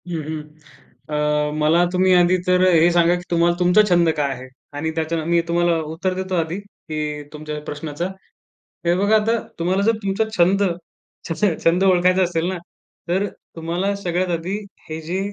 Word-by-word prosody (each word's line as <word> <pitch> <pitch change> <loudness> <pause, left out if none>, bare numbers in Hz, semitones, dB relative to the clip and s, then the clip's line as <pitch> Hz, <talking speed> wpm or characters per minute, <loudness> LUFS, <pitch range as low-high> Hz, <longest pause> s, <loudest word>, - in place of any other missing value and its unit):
हं, 165 -2 -3
हं. 155 +1 -5 0.7
अ, 150 0 +1
मला 160 +3 +4
तुम्ही 185 0 +3
आधी 180 +1 +4
तर 180 0 +3
हे 165 0 +5
सांगा, 175 0 +4
की 175 - -6
तुम्हा 170 0 +3
तुमचा 180 +4 +5
छंद 175 -2 +4
काय 140 -2 0
आहे? 130 0 -9 0.3
आणि 160 +2 -2
त्याच्य 160 0 -1
मी 170 0 +3
तुम्हाला 170 0 +2 0.2
उत्तर 185 +3 -1
देतो 185 0 -3
आधी, 165 +1 -1
की 155 -7 -6
तुमच्या 150 0 -6
प्रश्नाचं. 150 +3 -4 0.8
हे 170 +1 +3
बघा, 205 +4 +3
आता 220 +2 +2 0.2
तुम्हाला 185 +3 +1
जर 225 +2 +3
तुमचा 195 +2 +1
छंद 190 +3 +4 0.7
छ - - 0
छ - - +5 0.2
छंद 175 +3 +3
ओळखायचा 185 0 +4
असेल 170 -2 -1
ना, 185 - -3 0.5
तर 190 +3 +1 0.3
तुम्हाला 175 +5 -2
सगळ्यात 185 -1 -2
आधी 180 +5 -4 0.3
हे 155 0 -4
जे 170 +4 -3
175 Hz, 170 wpm, -21 LUFS, 160-185 Hz, 0.8 s, हे